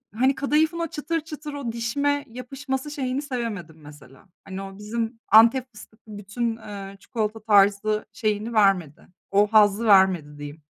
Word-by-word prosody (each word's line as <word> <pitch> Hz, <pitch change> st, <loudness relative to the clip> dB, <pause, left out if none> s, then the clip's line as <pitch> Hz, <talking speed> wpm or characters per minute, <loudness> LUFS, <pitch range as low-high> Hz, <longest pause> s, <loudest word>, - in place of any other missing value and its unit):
hani, 260 Hz, +4 st, +2 dB
kadayıfın 310 Hz, +4 st, +1 dB
o 335 Hz, -, -1 dB
çıtır 320 Hz, +2 st, -3 dB
çıtır, 300 Hz, -1 st, -8 dB
o 280 Hz, -5 st, -4 dB
dişime 285 Hz, +5 st, -1 dB
yapışması 265 Hz, +3 st, -5 dB
şeyini 270 Hz, -2 st, -2 dB
sevemedim 230 Hz, -, -5 dB
mesela. 145 Hz, +2 st, -16 dB, 0.2 s
Hani, 195 Hz, 0 st, -6 dB
o 195 Hz, 0 st, -9 dB
bizim 225 Hz, +2 st, -4 dB
Antep 235 Hz, +4 st, +6 dB
fıstıklı 215 Hz, -1 st, -13 dB
bütün, 225 Hz, +3 st, -3 dB
eee, 200 Hz, -3 st, -9 dB
çikolata 220 Hz, -1 st, -3 dB
tarzı 205 Hz, 0 st, +3 dB
şeyini 215 Hz, 0 st, -2 dB
vermedi. 195 Hz, -8 st, +1 dB, 0.2 s
O 200 Hz, +1 st, +4 dB
hazzı 210 Hz, +1 st, +4 dB
vermedi, 190 Hz, -8 st, +4 dB
diyeyim. 145 Hz, +1 st, -9 dB
220 Hz, 145 wpm, -24 LUFS, 200-260 Hz, 0.2 s, Antep